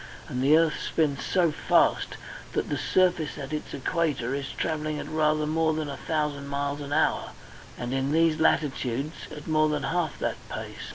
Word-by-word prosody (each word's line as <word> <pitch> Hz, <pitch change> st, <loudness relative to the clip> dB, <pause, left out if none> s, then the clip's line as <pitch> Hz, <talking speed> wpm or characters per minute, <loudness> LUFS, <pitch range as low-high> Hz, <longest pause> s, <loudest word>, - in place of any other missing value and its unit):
And 125 Hz, -, -3 dB
the 145 Hz, +4 st, +6 dB
earth 165 Hz, -1 st, +2 dB
spins 145 Hz, -4 st, 0 dB
so 175 Hz, -4 st, +2 dB
fast -, -, +2 dB, 0.4 s
that -, -, -1 dB
the 145 Hz, -, 0 dB
surface 175 Hz, -1 st, +2 dB
at 140 Hz, 0 st, -6 dB
its 150 Hz, -, -4 dB
equator 140 Hz, -4 st, -1 dB
is 140 Hz, -1 st, -3 dB
travelling 155 Hz, -1 st, -2 dB
at -, -, -5 dB
rather 155 Hz, -1 st, +2 dB
more 160 Hz, +1 st, +2 dB
than 155 Hz, -1 st, -2 dB
a 140 Hz, -, -4 dB
thousand 150 Hz, -2 st, -2 dB
miles 140 Hz, +1 st, -2 dB
an 140 Hz, 0 st, -6 dB
hour, 155 Hz, +2 st, +1 dB, 0.4 s
and 120 Hz, +1 st, -3 dB
in 135 Hz, +1 st, 0 dB
these 160 Hz, 0 st, +3 dB
latitudes 140 Hz, -2 st, +1 dB, 0.2 s
at 150 Hz, -1 st, -9 dB
more 155 Hz, -1 st, +3 dB
than 150 Hz, -1 st, -1 dB
half 170 Hz, -4 st, -1 dB
that -, -, -2 dB
pace. -, -, -6 dB
150 Hz, 180 wpm, -27 LUFS, 140-160 Hz, 0.4 s, the